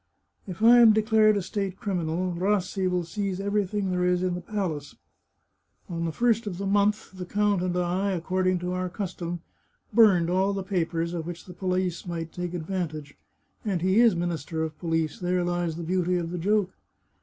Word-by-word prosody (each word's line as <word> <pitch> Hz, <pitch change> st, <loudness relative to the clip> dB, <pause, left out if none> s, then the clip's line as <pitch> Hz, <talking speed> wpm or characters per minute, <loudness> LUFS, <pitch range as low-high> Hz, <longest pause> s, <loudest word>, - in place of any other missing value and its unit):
" -, -, -42 dB
If 185 Hz, +3 st, -6 dB
I 240 Hz, +2 st, +8 dB
am 230 Hz, -2 st, +8 dB
declared 215 Hz, -1 st, +4 dB
a 200 Hz, -, -1 dB
state 195 Hz, 0 st, -3 dB
criminal, 180 Hz, -2 st, -1 dB
Rassi 190 Hz, +1 st, 0 dB
will 180 Hz, -1 st, 0 dB
seize 195 Hz, +2 st, -3 dB
every 200 Hz, 0 st, 0 dB
thing 200 Hz, -1 st, -2 dB
there 180 Hz, 0 st, 0 dB
is 180 Hz, 0 st, +2 dB
in 185 Hz, -1 st, 0 dB
the 175 Hz, -, -4 dB
palace. 175 Hz, -8 st, -4 dB, 0.9 s
On 170 Hz, -1 st, -3 dB
the 165 Hz, -, -1 dB
first 230 Hz, +3 st, +1 dB
of 180 Hz, -4 st, -4 dB
the 200 Hz, -, -4 dB
month, 205 Hz, +2 st, +1 dB
the 185 Hz, -, -6 dB
count 205 Hz, +1 st, +1 dB
and 180 Hz, -1 st, -1 dB
I, 180 Hz, +3 st, 0 dB
according 185 Hz, +1 st, 0 dB
to 180 Hz, 0 st, -2 dB
our 185 Hz, 0 st, -2 dB
custom, 175 Hz, -3 st, -5 dB, 0.5 s
burned 195 Hz, -7 st, +6 dB
all 190 Hz, +3 st, +1 dB
the 195 Hz, -1 st, -3 dB
papers 170 Hz, -3 st, -1 dB
of 165 Hz, -2 st, -4 dB
which 175 Hz, -1 st, -7 dB
the 180 Hz, -, -10 dB
police 180 Hz, -1 st, -2 dB
might 165 Hz, -2 st, -4 dB
take 180 Hz, 0 st, -4 dB
advantage 160 Hz, -4 st, -4 dB, 0.3 s
— -, -, -43 dB
and 190 Hz, -6 st, -1 dB
he 190 Hz, +4 st, +3 dB
is 235 Hz, -5 st, +6 dB
Minister 165 Hz, -2 st, -2 dB
of 155 Hz, -1 st, -4 dB
PoHce; 165 Hz, -3 st, -1 dB
there 180 Hz, 0 st, 0 dB
lies 175 Hz, -2 st, -1 dB
the 170 Hz, -, -5 dB
beauty 180 Hz, +1 st, 0 dB
of 170 Hz, -1 st, -3 dB
the 180 Hz, -, -3 dB
joke. 200 Hz, +1 st, +1 dB
180 Hz, 200 wpm, -26 LUFS, 175-200 Hz, 0.9 s, I